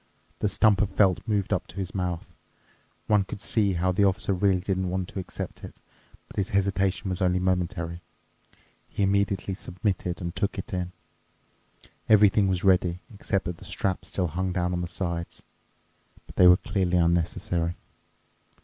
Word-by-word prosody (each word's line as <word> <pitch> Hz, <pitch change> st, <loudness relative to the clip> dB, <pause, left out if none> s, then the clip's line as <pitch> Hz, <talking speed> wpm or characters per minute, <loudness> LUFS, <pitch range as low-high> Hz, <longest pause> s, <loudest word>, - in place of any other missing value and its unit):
The 105 Hz, -, +1 dB
stump 105 Hz, -2 st, +3 dB
of 105 Hz, -, +1 dB
felt 95 Hz, -2 st, +3 dB
moved 105 Hz, -3 st, 0 dB
up -, -, -1 dB
to -, -, -14 dB
his 95 Hz, -2 st, -4 dB
mouth. 90 Hz, -3 st, -2 dB, 0.8 s
One 105 Hz, -2 st, +3 dB
could 95 Hz, +1 st, -8 dB
see 100 Hz, -4 st, +2 dB
how 90 Hz, +1 st, +1 dB
the 90 Hz, +3 st, +2 dB
Officer 95 Hz, 0 st, +2 dB
really 95 Hz, 0 st, +2 dB
didn't 95 Hz, 0 st, -1 dB
want 95 Hz, 0 st, -2 dB
to -, -, -5 dB
accept 95 Hz, -, -6 dB
it, -, -, -10 dB, 0.5 s
but -, -, -15 dB
his 100 Hz, -2 st, 0 dB
hesitation 95 Hz, -1 st, 0 dB
was 90 Hz, +1 st, -3 dB
only 90 Hz, 0 st, +3 dB
momentary—he 90 Hz, +1 st, -4 dB
immediately 100 Hz, 0 st, +1 dB
submitted 90 Hz, -1 st, -3 dB
and 85 Hz, -1 st, -5 dB
took 100 Hz, +1 st, -1 dB
it 95 Hz, -, -6 dB
in. 90 Hz, -1 st, -2 dB, 1.2 s
Everything 105 Hz, -1 st, +6 dB
was 95 Hz, -2 st, 0 dB
ready, 90 Hz, -2 st, +3 dB
except 100 Hz, -1 st, -1 dB
that 90 Hz, -1 st, -4 dB
the -, -, -14 dB
straps 95 Hz, -2 st, -2 dB
still 90 Hz, -3 st, -1 dB
hung 95 Hz, +3 st, -2 dB
down 90 Hz, 0 st, 0 dB
on 90 Hz, -, -1 dB
the 90 Hz, -, -3 dB
sides. 85 Hz, -1 st, -4 dB, 0.8 s
But -, -, -14 dB
they 90 Hz, -, +7 dB
were 90 Hz, 0 st, +8 dB
clearly 90 Hz, -1 st, 0 dB
unnecessary. 85 Hz, 0 st, +1 dB
95 Hz, 165 wpm, -26 LUFS, 90-100 Hz, 1.2 s, were